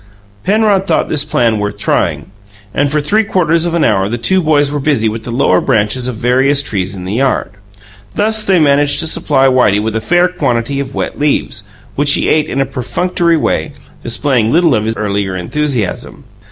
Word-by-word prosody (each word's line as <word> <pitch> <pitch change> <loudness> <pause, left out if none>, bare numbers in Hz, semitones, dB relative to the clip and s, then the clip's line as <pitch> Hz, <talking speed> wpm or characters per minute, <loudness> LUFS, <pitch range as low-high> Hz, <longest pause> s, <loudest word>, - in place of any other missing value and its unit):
Penrod 205 -2 +2
thought - - 0
this 150 -2 +1
plan 115 -7 0
worth 105 0 -3
trying, - - -1 0.4
and 145 +3 0
for 150 - +1
three 210 +10 +1
quarters 170 -4 +1
of 170 - -2
an 170 - +1
hour 95 +1 +1
the 120 - -2
two 185 +11 +2
boys 145 -3 +2
were 145 - -2
busy 135 -6 +1
with 110 +1 -4
the 120 - -5
lower 115 -7 +2
branches 110 +4 0
of 125 - -4
various 130 +5 +2
trees 100 -6 -3
in 90 -1 -8
the 95 - -4
yard. 130 -5 0 0.6
Thus 220 +1 +1
they 190 -3 +2
managed 145 -2 +2
to - - -2
supply 145 -3 +1
Whitey 125 -6 +3
with 110 +1 -3
a 115 - -1
fair 175 +9 +2
quantity 135 -7 -2
of 135 -1 -5
wet - - -4
leaves, 125 -8 -1 0.3
which 145 0 +3
he - - 0
ate 155 0 +1
in 135 - -2
a 135 - +2
perfunctory 170 +6 -1
way, 150 0 -1 0.3
displaying 115 0 0
little 165 0 +3
of 110 -2 0
his 110 0 -2
earlier 100 -2 -2
enthusiasm. 120 +3 -3
135 Hz, 195 wpm, -13 LUFS, 110-155 Hz, 0.6 s, Whitey